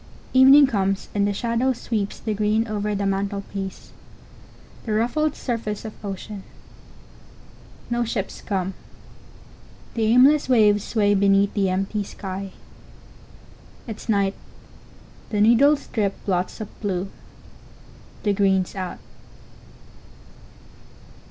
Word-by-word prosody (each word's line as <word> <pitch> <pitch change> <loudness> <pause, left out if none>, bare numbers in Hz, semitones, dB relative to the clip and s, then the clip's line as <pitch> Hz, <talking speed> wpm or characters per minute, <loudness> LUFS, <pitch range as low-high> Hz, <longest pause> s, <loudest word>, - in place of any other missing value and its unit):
Evening 270 +2 +8
comes, 195 -6 -1
and 200 -1 +1
the - - +1
shadow 235 +5 0
sweeps 215 -4 -3
the 220 - -2
green 215 +2 +1
over 210 -1 -2
the 200 0 -1
mantelpiece; 195 0 -4 0.9
the 220 - -3
ruffled 280 +8 +1
surface 225 -4 -4
of 215 - -6
ocean. 200 +1 -6 1.5
No 240 0 +1
ships 220 -4 -4
come; 190 -1 -2 1.2
the 225 -2 0
aimless 260 +6 +5
waves 210 -4 +4
sway 205 -3 +2
beneath 200 0 +3
the 195 -2 +1
empty 195 +3 -1
sky. 195 0 -6 1.3
It's 225 0 -8
night; 200 -2 +2 1.0
the 210 - -1
needles 265 +7 +5
drip 205 -3 0
blots 185 +1 -1
of 215 - -9
blue. 195 -2 -2 1.1
The 205 -2 +2
green's 190 -2 +1
out. 185 -2 -5
205 Hz, 105 wpm, -23 LUFS, 195-230 Hz, 1.5 s, Evening